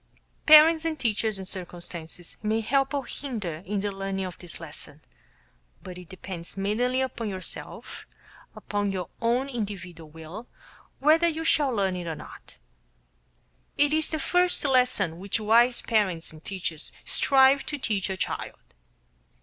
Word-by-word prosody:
Parents 315 +1 +8
and 325 -1 -1
teachers 220 -3 0
and 190 -1 -3
circumstances 175 -2 -5
may 220 +1 0
help 270 +4 +1
or 280 -3 -2
hinder 210 - -5
in 205 0 -1
the 205 0 -2
learning 195 0 -3
of 180 - -6
this 175 -2 -7
lesson; 150 -2 -9 0.8
but 185 - -8
it 180 -1 -11
depends 185 -1 -9
mainly 240 +6 +1
upon 235 -4 -3
yourself, 185 -2 -6 0.5
upon 205 -1 -2
your 185 -3 -4
own 240 +4 +1
individual 195 - -6
will, 160 +9 -9 0.5
whether 315 +4 +4
you 325 -1 -2
shall 300 -3 +3
learn 195 -6 0
it 175 -1 -5
or 160 - -3
not. - - -12 1.2
It 290 +1 +3
is 315 0 +1
the 315 - -1
first 355 +2 +2
lesson 250 - +2
which 200 +4 -2
wise 235 +3 +4
parents 190 -8 0
and 155 0 -14
teachers 175 -5 -4
strive 270 0 +5
to 295 - -3
teach 210 -7 -1
a 190 - -3
child. - - -3
210 Hz, 150 wpm, -27 LUFS, 180-265 Hz, 1.2 s, Parents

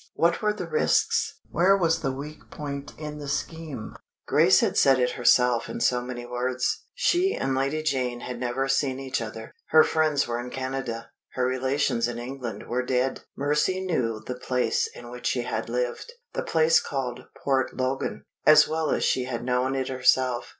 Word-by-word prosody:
What 170 +1 +2
were 210 -1 +2
the 210 - -5
risks? 465 0 +1
Where 195 +3 +4
was 165 -3 +1
the 135 - 0
weak 145 +3 -8
point 140 -2 -6
in 150 -1 -6
the 145 - -7
scheme? 150 -4 -4 0.3
Grace - - +5
had - - +1
said 135 -1 +5
it 125 -1 +1
herself 125 -1 +3
in - - -5
so 125 -1 +2
many 125 -1 -6
words 125 +1 -2
she 380 -4 +2
and 135 - -1
Lady 140 +4 0
Janet 125 -5 -1
had 125 -1 -5
never 125 +2 -1
seen 135 -1 +1
each 130 -2 -2
other. 110 0 -7
Her 155 0 +7
friends 155 -3 +1
were 120 0 -2
in 120 +1 -5
Canada; 130 -3 -4 0.2
her 125 - 0
relations 130 -1 +1
in 120 -1 -4
England 125 -1 -6
were 125 +1 -1
dead. 130 +1 0 0.2
Mercy 150 +6 +1
knew 125 -12 -1
the 125 - -3
place 125 0 0
in 120 0 -10
which 125 0 -5
she 125 - 0
had 110 -1 -3
lived 125 - -2 0.2
the - - -1
place 160 - +4
called 130 -3 -4 0.2
Port 135 -3 0
Logan 130 +1 -2 0.2
as 155 0 +7
well 160 -1 -1
as - - +1
she 130 - +1
had 120 -2 -4
known 125 +1 +1
it 130 -1 -2
herself. 130 -1 +2
130 Hz, 185 wpm, -26 LUFS, 125-150 Hz, 0.3 s, Her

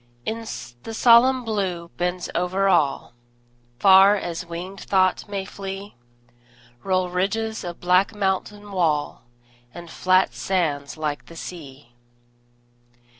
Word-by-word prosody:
The 225 - -6
solemn 250 +2 +5
Blue 185 -6 -2
bends 180 0 -2
over 185 +3 0
all; 160 -11 +1 0.6
Far 195 +7 +7
as 175 -4 -4
winged 180 +3 -7
thought 190 +1 +1
may 195 -1 -3
flee 195 0 -7 0.9
Roll 185 -2 0
ridges 220 +5 -1
of 175 -1 -7
black 185 +4 +2
mountain 205 +1 -2
wall, 160 -9 -1 0.5
And 170 -1 -10
flat 185 +1 +2
sands 155 -7 -2
like 150 -2 -4
the 165 - -12
sea. 140 -8 -10
185 Hz, 110 wpm, -23 LUFS, 170-200 Hz, 0.9 s, Far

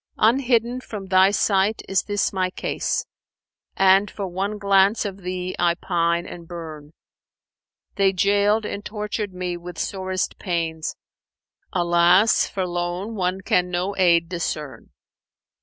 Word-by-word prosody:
Unhidden 240 +1 +2
from 210 -5 -7
thy 190 0 +5
sight 200 +1 +1
is 195 -1 +2
this 205 -1 0
my 185 -1 0
case; - - -2 0.4
* - - -70
And 195 +1 +5
for 200 - -5
one 195 +4 -3
glance 200 +2 +3
of 195 -2 -4
thee 180 0 -4
I 170 -1 +3
pine 170 -1 0
and 170 -2 -10
burn. 160 -3 -9 1.0
They 195 -1 +4
jailed 205 +3 +2
and 205 - -5
tortured 210 -1 -4
me 180 -1 -4
with 175 0 -9
sorest 185 -1 -3
pains: 165 -4 -2 0.4
* - - -51
Alas 175 +5 +4
for 190 -2 -3
lone 175 +4 -3
one 185 -2 -1
can 180 -1 +1
no 180 +3 -2
aid 170 -3 +3
discern! 150 -8 -5
185 Hz, 140 wpm, -23 LUFS, 175-200 Hz, 1.0 s, thy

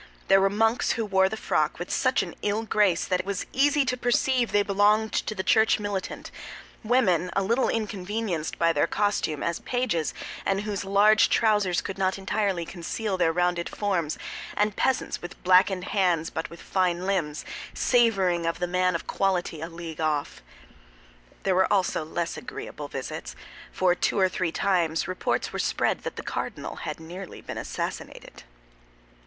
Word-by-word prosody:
There 195 0 +6
were 195 - +4
monks 225 +4 +2
who 225 - -2
wore 190 -2 +3
the 220 - -4
frock - - 0
with - - -6
such - - +2
an - - -7
ill 210 +2 0
grace 205 -6 +2
that 185 - 0
it 185 - -3
was 200 -1 -2
easy 285 +1 +3
to 255 -1 0
perceive 245 0 +1
they 205 0 +3
belonged 210 +2 +2
to 215 - -1
the 190 - -2
church 220 +2 +4
militant; 205 -2 -4 0.5
women 205 -7 +2
a 195 - +2
little 235 +7 +2
inconvenienced 205 -5 -2
by 165 0 +3
their 145 - +2
costume 205 -7 0
as 170 -1 -1
pages 245 -11 -1 0.3
and 195 0 0
whose 210 -2 -3
large 205 +2 +5
trousers 210 -5 +2
could 195 0 -5
not 190 0 +1
entirely 195 -3 -1
conceal 190 +4 -3
their 175 -3 +2
rounded 175 0 0
forms; 180 -7 -1 0.4
and 210 -1 +1
peasants 265 -1 0
with 175 - -8
blackened 185 0 +4
hands 180 -5 +1
but 160 - -4
with 170 - -12
fine 180 -1 0
limbs, 170 -7 -1 0.3
savoring 195 -9 +2
of 165 - -1
the 180 - -1
man 180 0 +1
of 170 - -3
quality 180 -5 -1
a 165 - -4
league 165 -2 -7
off. 150 -2 -1 1.0
There 190 - +2
were 190 +1 +3
also 190 -5 +1
less 165 +2 -3
agreeable - - -7
visits—for 185 -1 -3
two 180 - 0
or 190 -1 +4
three 180 -2 -1
times 170 -4 +1
reports 185 - -1
were - - -3
spread - - +1
that - - -6
the - - -6
cardinal - - -4
had - - -5
nearly 175 +3 -8
been - - -6
assassinated. - - -6
190 Hz, 170 wpm, -26 LUFS, 175-210 Hz, 1.0 s, There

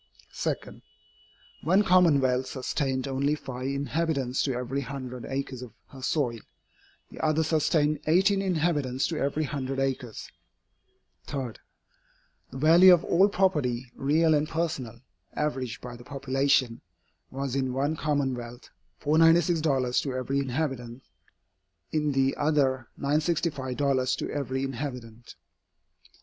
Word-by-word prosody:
2. - - 0 1.1
One 185 +7 +3
commonwealth 140 -9 +4
sustained 130 0 -2
only 140 +2 0
five 130 -3 -6
inhabitants 140 -1 -1
to 135 -3 0
every 125 +3 -2
hundred 125 -2 -6
acres 135 -2 -4
of 125 -4 -9 0.2
her 135 - -12
soil, 125 -4 0 0.7
the - - -8
other 155 0 +2
sustained 155 -1 +1
eighteen 195 +5 +4
inhabitants 155 -8 0
to 160 -3 -2
every 140 +3 0
hundred 135 -2 -3
acres. 130 -4 -3 1.0
3. 135 -4 -3 1.0
The 130 - -8
value 170 +6 +7
of 175 -2 +5
all 190 +4 +4
property, 130 -11 0
real 155 +4 +2
and 150 0 +1
personal, 135 -8 -3 0.3
averaged 135 -5 -2
by 120 -1 -8
the 120 - -12
population, 135 -2 0 0.5
was 135 -1 -4
in 130 -2 0
one 140 +4 0
commonwealth 130 -6 -3 0.3
$496 155 -4 +3
to 135 -3 -4
every 130 +2 -1
inhabitant, 130 -3 -3 0.9
in 150 -2 0
the 135 0 +2
other 135 -5 +1
$965 140 -4 0
to - - -4
every 135 -2 -2
inhabitant. 125 -4 -6
140 Hz, 115 wpm, -27 LUFS, 130-155 Hz, 1.1 s, value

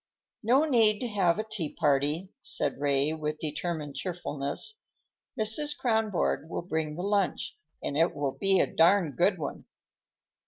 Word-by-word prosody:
"No 255 +7 +3
need 225 -7 +4
to 250 - -1
have 195 -5 +2
a 215 - -1
tea 215 -9 -4
party," 150 +4 +1
said 140 - -1
Ray 140 +1 +2
with 155 -1 -3
determined 155 -1 -4
cheerfulness. 170 - -3 0.6
"Mrs. 255 +8 +4
Kronborg 220 - 0
will - - -4
bring 160 -3 -2
the 175 - -5
lunch, 200 -1 0 0.3
and 140 - -3
it 165 +3 +2
will 145 -2 -1
be 195 +5 +2
a - - +4
darned 165 -4 +3
good - - +2
one." - - -6
175 Hz, 150 wpm, -28 LUFS, 150-210 Hz, 0.6 s, need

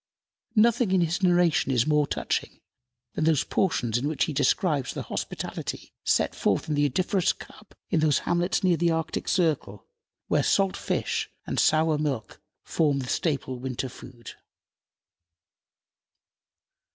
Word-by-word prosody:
Nothing 230 0 +4
in 185 - +4
his 170 +3 0
narration 175 -6 +3
is 120 -3 +2
more 150 -1 +2
touching - - -3 0.5
than 155 - -1
those 160 -4 +3
portions 120 - 0
in 140 - -2
which 155 -1 0
he 155 - -2
describes 145 - +1
the - - -4
hospitality - - -5
set - - +1
forth - - 0
in 155 - -1
the 145 0 +2
odoriferous 185 +5 +1
cup - - -15 0.2
in 170 - +3
those 155 -2 +3
hamlets 175 +3 0
near 180 -3 +3
the 170 +1 +2
Arctic 165 -1 -2
circle, 150 - 0 0.4
where - - +2
salt 195 -1 +2
fish - - -2 0.2
and - - -2
sour 155 -1 +3
milk 135 -8 -3 0.2
form 150 -4 +1
the 130 -2 -4
staple 135 -5 -1
winter 130 0 -4
food. 120 -1 -11
155 Hz, 140 wpm, -26 LUFS, 135-175 Hz, 0.5 s, Nothing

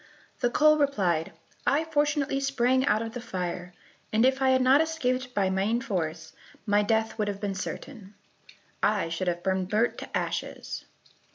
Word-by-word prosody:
The 245 - +2
coal 305 +4 +4
replied, 185 - +1 0.4
"I 295 +3 +3
fortunately 295 -3 +1
sprang 260 -2 +2
out 215 -2 +2
of 225 0 -6
the 245 - -5
fire, 180 -5 -4 0.4
and 225 +3 +3
if 265 +1 +2
I 265 - +4
had 260 0 +4
not 265 +4 +6
escaped 255 -6 -1
by 195 -2 +2
main 200 +5 +1
force, 160 -7 -3 0.3
my 205 -1 +3
death 220 +1 0
would 210 - +1
have 200 -1 -3
been 200 -1 -2
certain,—I 205 -2 -5
should 165 +3 -3
have 175 0 -1
been 190 -1 0
burnt 215 +5 0
to - - -3
ashes." - - -4
225 Hz, 165 wpm, -27 LUFS, 190-265 Hz, 0.4 s, not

